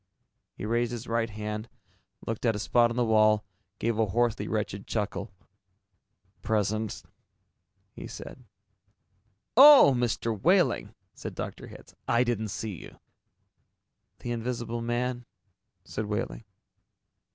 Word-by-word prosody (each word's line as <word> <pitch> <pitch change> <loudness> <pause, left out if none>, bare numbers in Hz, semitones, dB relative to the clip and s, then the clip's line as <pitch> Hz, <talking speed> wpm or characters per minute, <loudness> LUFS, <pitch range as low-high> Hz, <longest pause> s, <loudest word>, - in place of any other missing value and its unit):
He - - -6
raised 120 +1 0
his 120 -1 -5
right 115 -1 -1
hand, 105 +1 -5 0.6
looked 115 -1 -4
at 115 -3 +2
a - - -2
spot 120 +3 +3
on 120 - -4
the 120 -1 +1
wall, 110 -1 +4 0.3
gave 115 0 -1
a 110 - +3
hoarsely 110 0 0
wretched 105 -2 -3
chuckle. 105 0 -3 1.1
"Present," 110 0 -1 0.9
he - - -8
said. - - -10 1.1
"Oh, 270 - +9
Mr. 115 -2 -1
Wehling," 100 - +2 0.2
said - - -8
Dr. - - -6
Hitz, - - -14
"I 120 +1 +3
didn't 115 -3 -1
see 105 +1 -5
you." - - -13 1.2
"The 120 - -6
invisible 120 0 -3
man," 120 +1 -2 0.6
said 110 - -4
Wehling. 105 +2 -3
115 Hz, 120 wpm, -28 LUFS, 105-120 Hz, 1.2 s, Oh